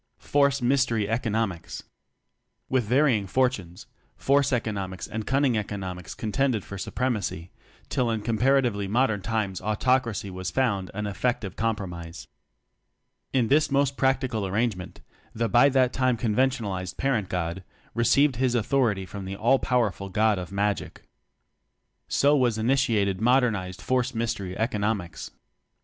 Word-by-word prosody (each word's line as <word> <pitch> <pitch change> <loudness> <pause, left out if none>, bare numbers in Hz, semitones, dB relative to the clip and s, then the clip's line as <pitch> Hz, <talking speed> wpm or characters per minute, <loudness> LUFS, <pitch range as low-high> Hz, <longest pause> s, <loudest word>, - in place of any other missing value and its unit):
Force 140 -2 +1
Mystery 120 -5 +2
Economics. 110 -6 -2 0.9
With 130 -3 +1
varying 125 -4 +2
fortunes 100 -8 -1 0.3
force 140 0 +2
eco 120 -3 0
nomics 95 -3 -5
and 110 0 -5
cunning 135 -2 +2
economics 95 -4 -6
con 110 - -4
tended 130 -5 +1
for 100 - -7
supremacy 105 -9 -2 0.4
till 125 -2 0
in 110 -2 -2
compara 130 +5 +3
tively 100 -5 -2
modern 110 -2 +1
times 105 -2 -2
autocracy 110 -2 0
was 95 0 -4
found 100 -8 0
an 105 +1 -3
effective 105 0 -2
compromise. 90 -7 -4 1.1
In 125 -4 +2
this 150 +4 +3
most 140 -1 +1
practical 130 -6 0
arrangement, 100 -2 -2 0.3
the 115 +1 0
(by 125 +5 +5
that 130 -2 +2
time 130 -2 +1
conventionalized) 110 -5 -1
parent 120 -8 0
god 90 +1 -3 0.3
received 130 +3 +3
his 125 -1 +1
authority 115 -4 +1
from 100 +1 -7
the 95 +1 -5
All 120 +6 +3
powerful 110 -6 0
God 105 +1 +2
of 90 0 -7
Magic. 100 +1 -2 1.0
So 145 +1 +3
was 125 -5 +2
initiated 110 -5 +1
modernized 110 -7 +1
force 125 -1 0
mystery 100 -5 -3
economics. 105 -6 -2
110 Hz, 130 wpm, -26 LUFS, 100-130 Hz, 1.1 s, by